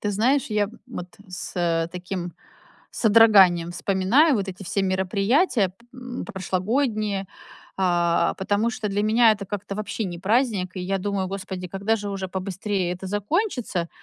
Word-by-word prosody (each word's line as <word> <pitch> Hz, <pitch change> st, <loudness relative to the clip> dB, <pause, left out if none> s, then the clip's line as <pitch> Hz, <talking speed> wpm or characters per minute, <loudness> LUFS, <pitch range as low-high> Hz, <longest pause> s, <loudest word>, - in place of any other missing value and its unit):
ты 205 Hz, -, -1 dB
знаешь, 250 Hz, +7 st, +2 dB
я 210 Hz, -1 st, +1 dB, 0.2 s
вот 180 Hz, -8 st, -7 dB, 0.2 s
с 170 Hz, -3 st, -1 dB
таким 180 Hz, -1 st, -5 dB, 0.6 s
содроганием 200 Hz, -6 st, +5 dB
вспоминаю 200 Hz, -, +3 dB
вот 200 Hz, -4 st, -1 dB
эти 190 Hz, +1 st, -7 dB
все 200 Hz, -, -1 dB
мероприятия 195 Hz, -, +2 dB
п 245 Hz, +5 st, -9 dB
прошлогодние, 205 Hz, +1 st, -1 dB, 0.5 s
а, 175 Hz, -2 st, +2 dB
потому 205 Hz, +4 st, +1 dB
что 215 Hz, -2 st, -3 dB
для 200 Hz, +1 st, 0 dB
меня 225 Hz, +1 st, +5 dB
это 200 Hz, -1 st, -5 dB
как-то 200 Hz, 0 st, -5 dB
вообще 215 Hz, +1 st, -3 dB
не 175 Hz, -3 st, -5 dB
праздник. 205 Hz, -2 st, +1 dB
И -, -, -3 dB
я 195 Hz, +2 st, -1 dB
думаю: 195 Hz, -1 st, -2 dB
"Господи, 190 Hz, -1 st, -5 dB
когда 200 Hz, +5 st, 0 dB
же 205 Hz, -1 st, -5 dB
уже 190 Hz, -1 st, -4 dB
побыстрее 190 Hz, 0 st, -2 dB
это 185 Hz, +2 st, -7 dB
закончится?". 205 Hz, -, -1 dB
195 Hz, 145 wpm, -24 LUFS, 185-220 Hz, 0.6 s, содроганием